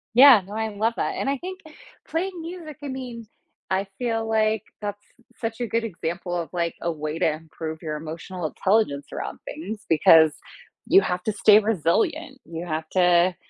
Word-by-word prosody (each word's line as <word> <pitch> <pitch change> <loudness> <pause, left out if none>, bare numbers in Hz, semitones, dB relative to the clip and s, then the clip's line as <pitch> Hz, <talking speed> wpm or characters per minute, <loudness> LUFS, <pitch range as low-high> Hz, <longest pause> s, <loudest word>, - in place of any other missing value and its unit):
Yeah, 255 -3 +9
no, 205 - -9
I 220 0 -1
love 215 +2 0
that. - - -1
And - - -1
I 280 - 0
think 370 +5 -7 0.5
playing 350 +2 -2
music, 330 -3 -8
I 290 - -5
mean, 250 -4 -6 0.4
I 190 +1 +1
feel 225 -2 -1
like 220 -1 +1 0.2
that's 205 0 -5 0.3
such 225 0 -4
a 240 - -1
good 230 +2 0
example 175 -3 -4
of, 170 -2 -3
like, 170 -1 -1
a 170 - 0
way 155 0 -4
to 165 -4 +2
improve 160 0 -7
your 155 -2 -3
emotional 165 +3 -5
intelligence 190 -6 +1
around - - -5
things 205 +6 -7
because 160 0 +7 0.6
you 390 - +7
have 180 - -2
to 215 - -1
stay 210 +1 +6
resilient. 270 - 0
You 165 +1 -6
have 160 -1 -3
to, 180 0 +4
205 Hz, 180 wpm, -24 LUFS, 165-235 Hz, 0.6 s, Yeah